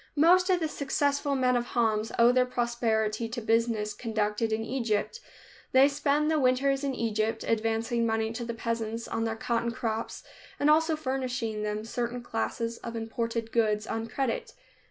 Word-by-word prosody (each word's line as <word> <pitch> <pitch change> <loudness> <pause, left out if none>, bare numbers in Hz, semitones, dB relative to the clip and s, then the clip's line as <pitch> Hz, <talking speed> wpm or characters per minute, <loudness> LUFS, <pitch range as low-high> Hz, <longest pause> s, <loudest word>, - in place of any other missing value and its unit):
Most 360 +5 +5
of 365 -1 +3
the 320 - 0
successful 285 0 0
men 255 -1 +2
of 240 - +1
Homs 220 -1 +1
owe 235 +1 +6
their 250 0 +3
prosperity 230 -2 0
to 235 +2 -4
business 225 -2 +1
conducted 220 0 -1
in 220 +1 0
Egypt. 235 - -1 0.5
They 265 +1 +7
spend 290 +1 +1
the 310 - +2
winters 270 +1 +2
in 275 -2 -1
Egypt, 220 -1 -1
advancing 225 +1 0
money 225 -1 0
to 240 +1 -4
the 235 0 -4
peasants 230 0 -3
on 225 0 -2
their 225 0 -1
cotton 235 +1 -1
crops 225 -1 -3 0.4
and 295 +1 +4
also 320 +1 +3
furnishing 255 -6 -2
them 210 +1 -3
certain 240 +1 -3
classes 230 0 -3
of 235 0 -7
imported 230 0 -3
goods 215 -2 +1
on 225 0 -3
credit. 245 +1 -2
230 Hz, 165 wpm, -28 LUFS, 225-260 Hz, 0.5 s, They